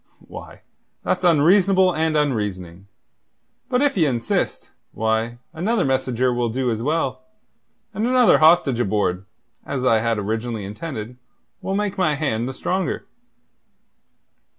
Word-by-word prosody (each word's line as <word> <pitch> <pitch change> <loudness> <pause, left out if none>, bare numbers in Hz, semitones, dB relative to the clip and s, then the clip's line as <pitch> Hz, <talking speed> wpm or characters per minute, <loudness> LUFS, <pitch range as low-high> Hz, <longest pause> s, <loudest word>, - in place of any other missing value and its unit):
"Why, - - -11 0.4
that's - - -1
unreasonable 185 +3 +4
and 160 -1 0
unreasoning. 100 - -2 0.8
But 250 +1 +2
if 285 -1 +1
ye 165 -6 +3
insist, 120 -4 -2 0.2
why, 110 +2 -1 0.2
another 195 +5 0
messenger 130 -2 0
will 120 -1 -1
do 125 +1 -1
as 110 0 -3
well, 160 - -1 0.7
and 215 +4 -1
another 250 -2 +5
hostage 155 -6 +4
aboard 95 -4 -1 0.4
as 130 -2 -3
I 115 -3 +4
had 115 0 0
originally 110 +1 -3
intended 110 +2 -7 0.4
will 190 - -3
make 205 -1 -2
my 155 -5 +2
hand 125 -5 -1
the - - -5
stronger." 185 +5 -2
130 Hz, 130 wpm, -21 LUFS, 110-175 Hz, 0.8 s, another